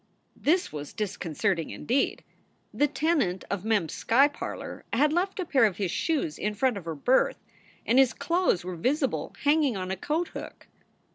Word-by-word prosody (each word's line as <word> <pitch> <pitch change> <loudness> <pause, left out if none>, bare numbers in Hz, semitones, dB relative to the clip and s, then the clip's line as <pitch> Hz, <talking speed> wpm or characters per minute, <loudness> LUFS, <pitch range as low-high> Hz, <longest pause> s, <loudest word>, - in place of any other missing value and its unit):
" - - -43
This 350 - +2
was 145 -1 -6
disconcerting 190 -4 -2
indeed. 265 +4 -1 0.5
The 290 - +3
tenant 295 - 0
of 200 -2 -2
Mem 220 -3 +2
s 160 - -7
sky 270 +5 +4
parlor 290 - -7
had 295 +6 +3
left 380 +4 0
a 370 - -1
pair 270 -6 +3
of 205 -4 +3
his 195 -4 -1
shoes 275 - -1
in 210 0 -2
front 255 +2 +1
of 195 -4 -7
her 165 -1 -4
berth, 250 - +2 0.5
and 245 +3 +4
his 265 -2 +5
clothes 335 - 0
were 185 -1 -4
visible 270 - -1
hanging 290 -5 +3
on 185 0 -4
a - - 0
coat 310 - -2
hook. - - -9
240 Hz, 185 wpm, -27 LUFS, 190-295 Hz, 0.5 s, his